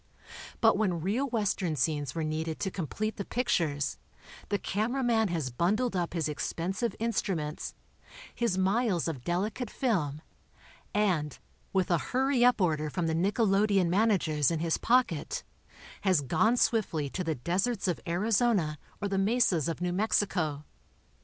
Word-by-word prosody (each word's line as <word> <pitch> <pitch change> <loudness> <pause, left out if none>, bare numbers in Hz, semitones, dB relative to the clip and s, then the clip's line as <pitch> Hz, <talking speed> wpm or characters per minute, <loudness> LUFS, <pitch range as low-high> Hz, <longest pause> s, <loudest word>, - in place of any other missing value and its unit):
But 225 -3 +5
when 185 -6 +1
real 220 - 0
Western 200 - 0
scenes 145 -1 -1
were 165 - -1
needed 155 +1 -3
to 190 - -1
complete 205 +6 -3
the 200 - -3
pictures, 165 - -1 0.5
the 205 - +1
camera 225 +8 -1
man 225 -3 +3
has 160 -8 -2
bun 170 - +2
dled 245 -4 -1
up 175 -1 -2
his 160 -3 0
expensive 180 +8 -2
instruments, 195 -9 -2 0.6
his 235 -6 0
miles 190 -2 +1
of 140 -7 -4
delicate 205 - -2
film, 160 - -1 0.7
and, 180 -8 0 0.3
with 190 -2 +1
a 170 - +3
hurry 260 - +1
up 245 -2 +5
order 155 -5 +1
from 175 +3 -2
the 160 - 0
nickelodeon 195 +1 +2
managers 180 - +2
in 165 - 0
his 165 +1 0
pocket, 235 - +1 0.6
has 185 -6 +3
gone 220 - +2
swiftly 185 -12 +1
to 185 - -3
the 160 -2 -1
deserts 190 - -1
of 180 - 0
Arizona 190 - +1 0.2
or - - +1
the 195 -1 0
mesas 195 - +2
of 165 - -4
New 180 0 0
Mexico. 180 -7 0
185 Hz, 150 wpm, -29 LUFS, 160-220 Hz, 0.7 s, But